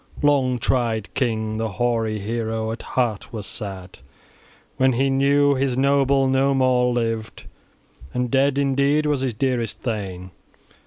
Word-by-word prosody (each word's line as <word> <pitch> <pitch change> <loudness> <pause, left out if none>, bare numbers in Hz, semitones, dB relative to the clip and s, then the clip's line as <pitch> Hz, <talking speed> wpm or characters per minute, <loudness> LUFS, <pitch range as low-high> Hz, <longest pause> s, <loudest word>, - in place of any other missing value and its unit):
Long 135 -4 +3
tried 115 -5 -1
king, 110 -4 -1
the 110 -2 -3
hoary 115 0 0
hero, 110 +1 -3
at 115 - -6
heart 120 -6 -2
was 110 -3 -6
sad 95 -3 -7 0.8
when 130 0 +3
he 135 +3 +1
knew 140 +1 +3
his 130 -2 0
noble 135 0 +3
no 135 +1 +2
more 125 -1 +3
lived, 115 -2 -3 0.7
and 125 -1 -2
dead 135 +1 +2
indeed 140 +2 +2
was 145 -3 0
his 130 -4 -2
dearest 120 -2 -2
thane. 95 -6 -4
125 Hz, 140 wpm, -22 LUFS, 110-135 Hz, 0.8 s, Long